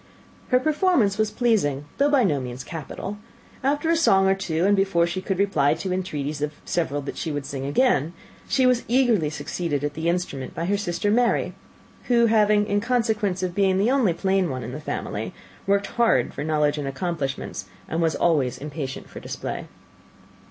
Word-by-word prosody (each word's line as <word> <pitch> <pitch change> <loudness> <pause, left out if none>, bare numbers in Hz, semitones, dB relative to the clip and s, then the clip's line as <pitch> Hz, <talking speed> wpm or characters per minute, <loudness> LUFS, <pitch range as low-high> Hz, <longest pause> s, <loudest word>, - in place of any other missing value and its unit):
Her 250 - +4
performance 295 - +2
was 215 -1 +2
pleasing, 170 - +1
though 285 +1 +4
by 280 -4 +4
no 150 -9 +2
means 125 0 -6
capital. 170 +7 -6 0.4
After 290 +4 +1
a - - +4
song 195 -13 +4
or 190 - +5
two, 180 -3 -1
and 205 +1 +4
before 195 -3 +2
she 175 +2 -3
could 190 -1 -2
reply 155 -7 +2
to 180 +4 -4
the - - 0
entreaties 150 -6 -3
of 150 0 -1
several 145 -4 -1
that 140 - -6
she 160 - -3
would 145 -1 -3
sing 135 -1 -4
again, 165 - +2 0.3
she 265 -2 +2
was 250 -1 +3
eagerly 235 - +3
succeeded 145 0 -3
at 145 0 -1
the 160 +2 -1
instrument 170 -7 -3
by 165 - -2
her 200 +3 +1
sister 200 0 -1
Mary, 240 +2 +2 0.5
who 235 -1 +4
having, 210 -2 +4
in 205 0 0
consequence 220 -5 0
of 180 -1 -1
being 190 -1 +2
the 210 +6 +2
only 260 -9 +3
plain 190 0 +1
one 130 -2 -4
in 115 - -6
the 140 - -6
family, - - -4 0.3
worked 200 0 +2
hard 230 - +2
for 140 - -4
knowledge 150 -1 +1
and 140 - -3
accomplishments, 135 -1 -3 0.3
was 165 -1 +1
always 145 -8 +1
impatient 140 -2 -6
for - - -10
display. - - -5
185 Hz, 185 wpm, -24 LUFS, 150-215 Hz, 0.5 s, or